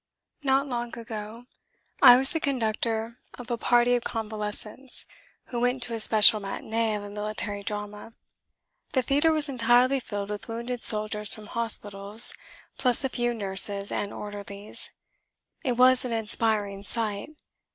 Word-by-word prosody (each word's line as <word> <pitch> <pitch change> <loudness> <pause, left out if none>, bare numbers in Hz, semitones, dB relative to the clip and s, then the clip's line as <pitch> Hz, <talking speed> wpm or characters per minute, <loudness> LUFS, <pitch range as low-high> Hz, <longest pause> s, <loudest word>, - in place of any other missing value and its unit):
Not 270 0 +2
long 240 -3 -4
ago 225 0 -8 0.6
I 245 -3 +10
was 270 +1 -1
the 325 - -1
conductor 230 -3 -2 0.2
of 245 -1 -9
a - - +1
party 240 +1 +3
of 240 -1 0
convalescents 215 +3 -5 0.4
who 240 - -3
went 245 +1 0
to 240 - -4
a 225 - -3
special 215 0 +7
matinée 220 +2 -2
of 205 - -8
a 205 - -8
military 210 0 -4
drama. 210 +1 -6 0.8
The 260 - +2
theatre 290 +5 +3
was 310 -1 0
entirely 250 +1 +3
filled 205 -4 -5
with 210 - -6
wounded 235 +1 -5
soldiers 210 -1 +3
from 215 - -12
hospitals, 210 -1 -2 0.5
plus 250 -1 +3
a 265 - 0
few 240 -1 -1
nurses 200 -1 +3
and 205 - -3
orderlies. 205 0 -8 0.7
It 255 -5 +1
was 255 +1 +5
an 250 -2 -3
inspiring 215 -3 -1
sight. 215 +6 -4
225 Hz, 145 wpm, -26 LUFS, 210-245 Hz, 0.8 s, I